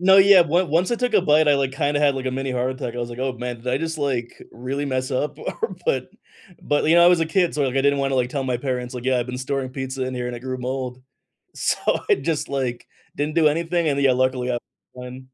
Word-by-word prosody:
No, 190 Hz, +1 st, +6 dB
yeah, 195 Hz, -1 st, +8 dB
one 175 Hz, +3 st, +1 dB
once 170 Hz, +7 st, +1 dB
I 235 Hz, -, +1 dB
took 250 Hz, 0 st, -1 dB
a -, -, +5 dB
bite, 155 Hz, -1 st, +4 dB
I 145 Hz, -, +6 dB
like, 135 Hz, -1 st, 0 dB
kinda 145 Hz, +1 st, 0 dB
had, 145 Hz, -2 st, +3 dB
like, 130 Hz, 0 st, -4 dB
a -, -, +1 dB
mini 135 Hz, 0 st, -3 dB
heart 125 Hz, 0 st, -1 dB
attack. 125 Hz, -2 st, -5 dB
I 120 Hz, -, -5 dB
was 120 Hz, -, -3 dB
like, 120 Hz, +2 st, -7 dB
"Oh, 130 Hz, -1 st, -1 dB
man, 125 Hz, 0 st, -5 dB
did 120 Hz, +2 st, -8 dB
I 130 Hz, +2 st, +1 dB
just, 160 Hz, 0 st, -3 dB
like, 130 Hz, -5 st, -2 dB, 0.2 s
really 135 Hz, +4 st, -4 dB
mess 130 Hz, -1 st, -2 dB
up? 145 Hz, +4 st, -2 dB
Or" 455 Hz, -1 st, -4 dB
but 485 Hz, -, 0 dB, 0.5 s
but, 145 Hz, -, +1 dB
you 165 Hz, +2 st, +4 dB
know, 170 Hz, -, +7 dB
I -, -, +8 dB
was 175 Hz, -2 st, +4 dB
a 165 Hz, -, +1 dB
kid, 175 Hz, 0 st, +1 dB
so, 150 Hz, -, 0 dB
like, 130 Hz, 0 st, -2 dB
I -, -, +4 dB
didn't 140 Hz, 0 st, +3 dB
wanna, 135 Hz, -1 st, 0 dB
like, 125 Hz, -1 st, +1 dB
tell 135 Hz, 0 st, -3 dB
my 125 Hz, -2 st, 0 dB
parents, 125 Hz, -1 st, -3 dB
like, 125 Hz, 0 st, -6 dB
"Yeah, 130 Hz, -1 st, +2 dB
I've 120 Hz, -, -2 dB
been 125 Hz, 0 st, -5 dB
storing 130 Hz, 0 st, -3 dB
pizza 130 Hz, 0 st, -4 dB
in 130 Hz, -, -4 dB
here, 125 Hz, -1 st, -3 dB
and 125 Hz, -, -4 dB
it 120 Hz, -, -9 dB
grew 130 Hz, 0 st, -4 dB
mold." 125 Hz, 0 st, -4 dB, 0.5 s
So -, -, 0 dB, 0.3 s
I 405 Hz, -, +6 dB
just, 155 Hz, -3 st, -2 dB
like, 130 Hz, -3 st, -3 dB, 0.3 s
didn't 150 Hz, +1 st, -2 dB
do 160 Hz, -2 st, +5 dB
anything 165 Hz, +1 st, 0 dB
and, 140 Hz, -1 st, 0 dB
yeah, 135 Hz, -2 st, +4 dB
luckily, 130 Hz, 0 st, 0 dB
I 120 Hz, -, 0 dB, 0.4 s
won. 125 Hz, +1 st, -9 dB
135 Hz, 280 wpm, -22 LUFS, 125-155 Hz, 0.5 s, yeah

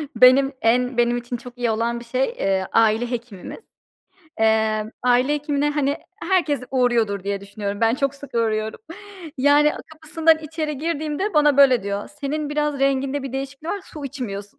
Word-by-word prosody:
benim 265 Hz, +2 st, +6 dB
en 245 Hz, +2 st, +2 dB
benim 240 Hz, 0 st, +2 dB
için 240 Hz, 0 st, -5 dB
çok 245 Hz, +1 st, -12 dB
iyi 240 Hz, -2 st, 0 dB
olan 235 Hz, +2 st, -1 dB
bir 235 Hz, -, -12 dB
şey, 255 Hz, +3 st, 0 dB
eee, 190 Hz, -1 st, 0 dB
aile 225 Hz, +2 st, +2 dB
hekimimiz. 230 Hz, -, -6 dB, 0.8 s
Eee, 220 Hz, 0 st, +1 dB
aile 250 Hz, +3 st, +3 dB
hekimine, 295 Hz, 0 st, 0 dB
hani, 290 Hz, -1 st, 0 dB, 0.3 s
herkes 320 Hz, -8 st, +2 dB
uğruyordur 230 Hz, -6 st, +1 dB
diye 200 Hz, -1 st, -2 dB
düşünüyorum. 200 Hz, +1 st, -5 dB
Ben 225 Hz, +1 st, +3 dB
çok 275 Hz, +1 st, -1 dB
sık 280 Hz, -1 st, -12 dB
uğruyorum. 220 Hz, -, -1 dB, 0.6 s
Yani 290 Hz, +2 st, +4 dB, 0.2 s
kapısından 315 Hz, +1 st, +2 dB
içeri 305 Hz, -2 st, -4 dB
girdiğimde 315 Hz, +5 st, -2 dB
bana 295 Hz, -2 st, +4 dB
böyle 260 Hz, -5 st, +6 dB
diyor 200 Hz, +1 st, -4 dB
"Senin 295 Hz, +1 st, -2 dB
biraz 295 Hz, -1 st, -1 dB
renginde 275 Hz, 0 st, 0 dB
bir 270 Hz, -, -6 dB
değişiklik 275 Hz, +4 st, -5 dB
var, 405 Hz, -, -3 dB
su 300 Hz, -6 st, -9 dB
içmiyorsun." 210 Hz, -7 st, -6 dB
255 Hz, 160 wpm, -22 LUFS, 225-295 Hz, 0.8 s, benim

